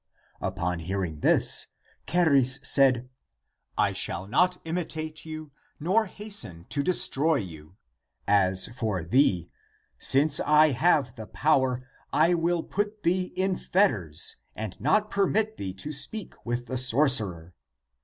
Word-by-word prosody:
Upon 90 0 -3
hearing 90 -2 -4
this, - - +3 0.4
Charis 140 -7 +4
said, 130 -3 +3 0.3
" - - -46
I - - -4
shall 95 +3 -1
not 180 - +1
imitate 160 -2 -5
you 155 -1 -8 0.3
nor 190 +8 +1
hasten 185 - -1
to 145 - -1
destroy 160 -1 +2
you. 80 -2 -7 0.5
As 95 -2 +3
for 110 -7 -3
thee, 90 - +1 0.5
since 145 +2 +4
I 150 +1 +4
have 135 -2 +1
the 110 -1 -8
power, 130 -3 0 0.2
I 165 +3 +3
will 170 0 0
put 205 +1 -4
thee 180 +2 +1
in 190 0 0
fetters 105 - 0 0.2
and 110 -3 -6
not 210 - +1
permit 215 +2 0
thee 95 -1 -6
to 150 +11 -6
speak 200 +9 -4
with 120 +1 -3
the 130 +1 -2
sorcerer. 115 - +1
135 Hz, 130 wpm, -26 LUFS, -, 0.5 s, Charis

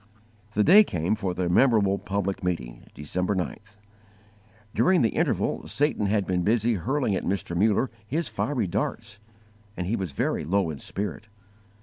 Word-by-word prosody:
The 105 - +3
day 200 - +8
came 85 - -1
for 95 -4 -2
the 90 -1 -1
memorable 100 0 +3
public 100 -1 -3
meeting 60 -10 -4
December 90 +7 -2
9th. 100 +3 -5 1.0
During 185 -6 +3
the 115 - +3
interval - - -1
Satan 145 -8 0
had 100 -1 +1
been 90 -1 0
busy 115 +4 +2
hurling 125 - 0
at - - -2
Mr. 95 -2 -2
Muller 105 +6 +2 0.2
his 160 +8 -1
fiery 135 -7 -1
darts, 100 +2 -3 0.6
and 90 - -2
he 105 +6 0
was 95 -7 -3
very - - -1
low 95 -2 +1
in 70 - -8
spirit. 105 +2 -5
100 Hz, 155 wpm, -26 LUFS, 90-115 Hz, 1.0 s, day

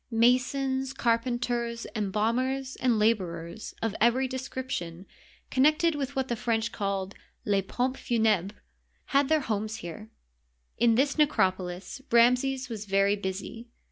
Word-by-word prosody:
Masons, 255 +3 +2
carpenters, 235 -1 -1
embalmers, 235 +6 -1
and 245 -3 +2
laborers 185 -4 -1
of 225 -3 0
every 245 +3 +3
description 255 -9 -5 0.5
connected 305 +5 +3
with 280 -1 -4
what 265 -1 0
the 240 - -1
French 225 0 -1
call 195 -2 -2 0.2
" - - -42
les 200 -2 +2
pompes 250 +7 -2
funhbres 220 -6 +1 0.3
" - - -42
had 280 -1 +3
their 315 -1 +3
homes 215 -3 -2
here. 215 +6 -8 0.7
In 230 -1 +3
this 280 +5 +1
necropolis 185 -6 0
Ramses 250 +3 +3
was 220 -3 -6
very 195 +1 +3
busy. 200 +4 -5
235 Hz, 130 wpm, -28 LUFS, 205-260 Hz, 0.7 s, every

